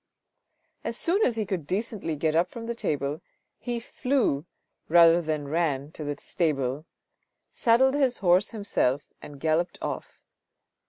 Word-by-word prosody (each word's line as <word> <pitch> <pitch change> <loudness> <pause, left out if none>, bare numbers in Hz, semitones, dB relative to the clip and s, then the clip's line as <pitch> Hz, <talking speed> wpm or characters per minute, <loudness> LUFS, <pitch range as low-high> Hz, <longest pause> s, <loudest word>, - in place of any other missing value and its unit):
As - - -3
soon 380 +5 +1
as 240 - +2
he 220 -2 -1
could 185 -6 -3
decently 195 -4 -2
get 155 +1 0
up 170 +3 +2
from 235 -1 -8
the 235 - -2
table, 145 - -2 0.4
he 240 -1 -3
flew 230 - 0 0.4
rather 170 +1 +7
than 155 -3 -2
ran 145 -2 -1
to 155 - -7
the 145 -1 -3
stable, 145 -3 -1 0.7
saddled 255 +3 +4
his 270 -4 +2
horse 185 +2 +3
himself, 145 - -1
and 145 -1 -10
galloped 160 +3 0
off. - - -5
170 Hz, 145 wpm, -27 LUFS, 150-230 Hz, 0.7 s, rather